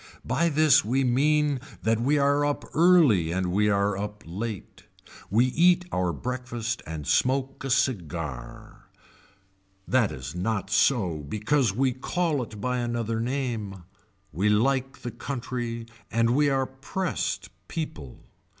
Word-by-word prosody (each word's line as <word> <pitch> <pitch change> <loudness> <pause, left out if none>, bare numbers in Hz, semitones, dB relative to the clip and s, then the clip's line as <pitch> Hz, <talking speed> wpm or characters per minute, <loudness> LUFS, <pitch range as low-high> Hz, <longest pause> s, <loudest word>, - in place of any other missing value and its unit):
By 140 +8 +1
this 155 -1 +5
we 130 +5 +1
mean 145 +3 +2 0.2
that 115 0 +1
we 145 +5 +2
are 140 +1 +3
up 145 0 -1
early 155 - +5
and 90 0 -1
we 105 +3 +2
are 100 0 +2
up 105 +1 -5
late. 100 +4 -6 0.5
We 115 +6 +4
eat 175 +7 +3
our 90 -1 0
breakfast 120 - -4
and 80 -2 -5
smoke 135 - +1
a 135 - -3
cigar. 85 - -3 1.0
That 125 -5 +2
is 65 -1 -7
not 100 +2 -2
so 95 - +2
because 115 - +1
we 130 +1 +2
call 155 +3 -1
it 110 -3 -7
by 125 +3 -1
another 120 -2 -2
name. 115 -7 -3 0.5
We 95 +7 +1
like 135 +5 +1
the 120 - -4
country 120 -3 -4 0.2
and 115 +1 +2
we 145 +3 +3
are 135 -1 +1
pressed 130 - -3 0.2
people. 80 - -6
120 Hz, 135 wpm, -26 LUFS, 100-135 Hz, 1.0 s, this